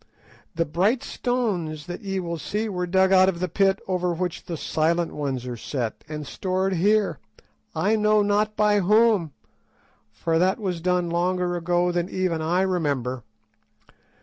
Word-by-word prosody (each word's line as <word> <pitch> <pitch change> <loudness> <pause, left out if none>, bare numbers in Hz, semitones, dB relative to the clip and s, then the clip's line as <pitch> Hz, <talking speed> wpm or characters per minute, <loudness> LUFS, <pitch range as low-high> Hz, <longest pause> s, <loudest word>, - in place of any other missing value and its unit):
The 165 0 +1
bright 190 - +1
stones 185 - -2
that 175 +5 -7
ye 195 -2 -3
will 170 -2 -4
see 210 +7 -2
were 180 -3 -3
dug 190 +1 +3
out 185 0 +6
of 170 -3 -3
the 185 - -1
pit 195 +2 +2
over 180 -2 0
which 180 0 -3
the 170 - -4
Silent 165 +3 0
Ones 135 -4 -3
are 125 -1 -4
set, 120 -1 -4
and 150 -1 -5
stored 190 +5 -1
here, 205 +4 +2 0.6
I 220 - +2
know 210 0 +3
not 210 +1 +1
by 210 -1 +3
whom, 210 -3 +3 0.8
for 165 -1 0
that 185 +3 +2
was 185 -5 -3
done 180 -1 0
longer 180 +1 0
ago 175 +1 +1
than 175 0 -1
even 185 -4 -1
I 175 +4 +1
remember. 140 -9 -1
180 Hz, 160 wpm, -24 LUFS, 165-195 Hz, 0.8 s, out